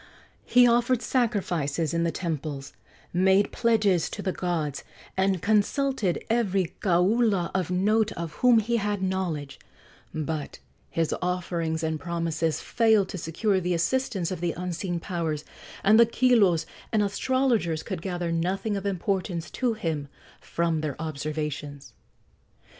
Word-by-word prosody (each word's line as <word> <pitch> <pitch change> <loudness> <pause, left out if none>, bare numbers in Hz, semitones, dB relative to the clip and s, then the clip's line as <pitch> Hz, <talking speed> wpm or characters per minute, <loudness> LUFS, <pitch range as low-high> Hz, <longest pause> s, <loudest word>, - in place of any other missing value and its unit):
He 250 0 +6
offered 240 +1 +2
sacrifices 175 - 0
in 170 0 +1
the 170 - +1
temples, 150 -4 -4 0.4
made 190 +3 +3
pledges 210 -7 +2
to 205 - -6
the 190 - 0
gods, 165 -7 -2 0.3
and 190 -2 +1
consulted 215 -1 +1
every 200 -6 +1
kaula 190 +1 +2
of 185 -3 -1
note 210 +4 +2
of 170 -2 -5
whom 250 -2 +6
he 230 +2 +1
had 205 -2 -1
knowledge; 170 -7 -2 0.5
but 155 -1 -4 0.3
his 165 -1 0
offerings 175 -3 -1
and 160 -1 -1
promises 165 -1 -1
failed 220 -4 +3
to 185 - -5
secure 190 +5 0
the 180 -1 0
assistance 190 0 0
of 180 -3 -4
the 175 -1 0
unseen 175 0 -3
powers, 165 -4 -3 0.4
and 215 +3 +6
the 235 - +7
kilos 225 -9 +3 0.3
and 215 -2 +3
astrologers 215 - +1
could 185 -5 -5
gather 175 -2 -3
nothing 185 +6 -1
of 200 0 -3
importance 185 -2 -2
to 250 -3 0
him 160 -8 -3 0.3
from 165 -2 -1
their 150 -3 -4
observations. 150 -2 -4
180 Hz, 135 wpm, -26 LUFS, 165-210 Hz, 0.5 s, the